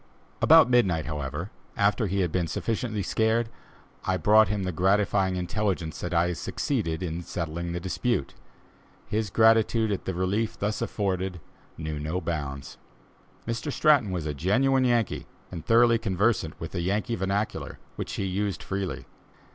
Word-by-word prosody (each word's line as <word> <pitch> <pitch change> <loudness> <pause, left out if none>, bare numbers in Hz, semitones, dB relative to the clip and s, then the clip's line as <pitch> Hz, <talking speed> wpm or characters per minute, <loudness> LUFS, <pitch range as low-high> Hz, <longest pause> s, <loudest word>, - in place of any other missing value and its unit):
About 160 -3 +7
midnight, 95 -11 +2
however, 75 +4 -4 0.3
after 105 +1 +2
he 100 +1 0
had 90 -3 0
been 90 -1 0
sufficiently 110 +2 -2
scared, 110 +3 +1 0.5
I 95 - 0
brought 110 +2 +5
him 100 0 -2
the 90 - -1
gratifying 95 +1 +2
intelligence 90 -2 -2
that 90 - -4
I 85 0 +2
had 90 - -3
succeeded 95 - -2
in 85 -1 -3
settling 85 0 -4
the 85 - -3
dispute. 95 - -1 0.7
His 110 -1 -1
gratitude 110 +1 +4
at 100 - -3
the 95 - -2
relief 100 +5 -1
thus 105 +1 -2
afforded, 95 -3 -2 0.4
knew 80 -2 -4
no 80 +5 -2
bounds. 70 -6 -5 0.7
Mr. 115 +5 -2
Stratton 145 -8 +4
was 90 -4 -3
a 75 - -2
genuine 130 - +2
Yankee, 120 -4 0 0.2
and 85 -4 -6
thoroughly 115 +3 +5
conversant 100 -5 0
with 80 - -6
the 85 - -3
Yankee 105 +6 -1
vernacular, 100 +2 -2 0.2
which - - -5
he 100 - -2
used 95 0 -2
freely. 95 -1 -4
95 Hz, 155 wpm, -27 LUFS, 85-110 Hz, 0.7 s, About